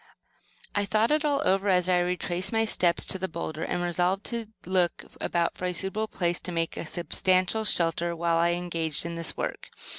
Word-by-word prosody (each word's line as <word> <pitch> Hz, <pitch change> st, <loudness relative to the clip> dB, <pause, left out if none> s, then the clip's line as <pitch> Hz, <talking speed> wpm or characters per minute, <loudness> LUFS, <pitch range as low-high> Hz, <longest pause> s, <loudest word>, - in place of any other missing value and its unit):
I 205 Hz, -, +1 dB
thought 215 Hz, +4 st, +2 dB
it 305 Hz, 0 st, +2 dB
all 290 Hz, -1 st, +1 dB
over 195 Hz, +1 st, +2 dB
as 180 Hz, -1 st, +3 dB
I 180 Hz, -1 st, +3 dB
retraced 180 Hz, +1 st, 0 dB
my 225 Hz, -1 st, +2 dB
steps 175 Hz, -5 st, +3 dB
to 190 Hz, -, 0 dB
the 190 Hz, -, -1 dB
boulder, 160 Hz, -2 st, -5 dB
and 175 Hz, +1 st, -2 dB
resolved 180 Hz, +3 st, 0 dB
to 235 Hz, -2 st, -3 dB, 0.2 s
look 180 Hz, -1 st, +1 dB, 0.2 s
about 170 Hz, -1 st, 0 dB
for 185 Hz, -, -5 dB
a 180 Hz, -, 0 dB
suitable 195 Hz, +5 st, -2 dB
place 175 Hz, -4 st, -1 dB
to 180 Hz, -, -5 dB
make 165 Hz, -1 st, -2 dB
a -, -, -5 dB
substantial 185 Hz, +5 st, +1 dB
shelter 170 Hz, -2 st, +2 dB
while 170 Hz, 0 st, +1 dB
engaged 170 Hz, -3 st, 0 dB
in 170 Hz, -, -4 dB
the 165 Hz, -1 st, -1 dB
work. -, -, -4 dB
180 Hz, 190 wpm, -27 LUFS, 170-195 Hz, 0.2 s, as